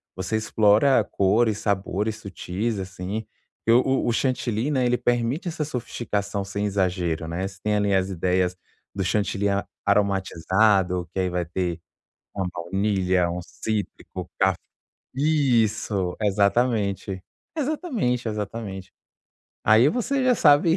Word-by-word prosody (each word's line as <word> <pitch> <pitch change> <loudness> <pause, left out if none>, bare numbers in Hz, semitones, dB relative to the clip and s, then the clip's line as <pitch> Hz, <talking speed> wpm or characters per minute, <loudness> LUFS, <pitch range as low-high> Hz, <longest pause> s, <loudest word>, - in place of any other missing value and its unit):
você 95 +4 -3
explora 110 +3 +4
cores, 105 +3 +2
sabores 105 +1 -1
sutis 100 +2 -3
assim, 95 +3 -5 0.4
eu 115 +2 +6
o 135 0 +1
o - - +3
chantilly, 125 0 0
né, 130 -4 +1
ele 125 0 +2
permite 120 +8 0
essa 155 -3 -2
sofisticação 105 -6 -3
sem 100 +1 -3
exagero, 90 -5 -1
né, 90 +4 -2
você 95 -1 -11
tem 105 0 +1
ali 100 -1 +1
as 95 0 +1
ideias 90 0 +1 0.4
do 95 - -2
chantilly 100 +1 0
a 100 0 0 0.2
aromatizado 95 -2 +2
que 95 - -2
aí 90 -1 +1
vai 90 -1 -1
ter 90 0 -2 0.6
uma 95 -2 -1
baunilha, 95 0 +1
um 90 - -3
cítrico, 100 -3 -5
caf 95 -1 +3 0.6
isso, 115 - +1
exatamente, 100 -2 +1 0.3
exatamente, 255 - -1
exatamente. 105 -3 -5 0.7
Aí 110 +6 +6
você 260 - 0
já 255 - +5
sabe 160 0 +5
100 Hz, 125 wpm, -24 LUFS, 95-120 Hz, 0.7 s, eu